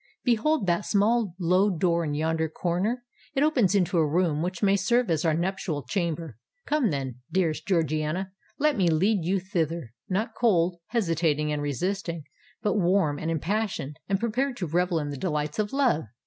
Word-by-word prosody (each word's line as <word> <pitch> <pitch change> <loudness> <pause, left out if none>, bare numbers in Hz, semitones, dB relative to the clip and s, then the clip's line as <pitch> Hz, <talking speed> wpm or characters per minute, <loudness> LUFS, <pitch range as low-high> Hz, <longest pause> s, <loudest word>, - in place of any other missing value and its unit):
Behold 245 +1 +2
that 175 +2 +1
small 210 -2 +1
low 185 +3 +3
door 170 -2 +1
in 145 -2 -2
yonder 160 +1 0
corner: 185 +10 -1 0.3
it 270 - +3
opens 250 - +3
into 180 -3 +2
a 155 - +3
room 160 -2 +1
which 180 +3 -3
may 200 0 +5
serve 230 +2 +2
as 160 -2 +1
our 160 -2 +2
nuptial 170 -4 -2
chamber. 165 - -3 0.3
Come, 290 -6 +2
then, 135 -5 -3
dearest 170 -4 0
Georgiana—let 185 - -1
me 185 -4 +2
lead 185 +4 +2
you 190 +4 +1
thither—not 170 - -3
cold, 180 -7 +2
hesitating, 165 -8 +1
and 150 - -2
resisting—but 170 - -3
warm, 180 -6 +2
and 160 - -3
impassioned, 165 -3 -2
and 195 -1 +1
prepared 245 +4 -1
to 180 - -2
revel 175 +2 +1
in 150 -2 -2
the 140 - -5
delights 150 0 -2
of 205 -1 0
love! 260 - +2
180 Hz, 160 wpm, -26 LUFS, 160-205 Hz, 0.3 s, may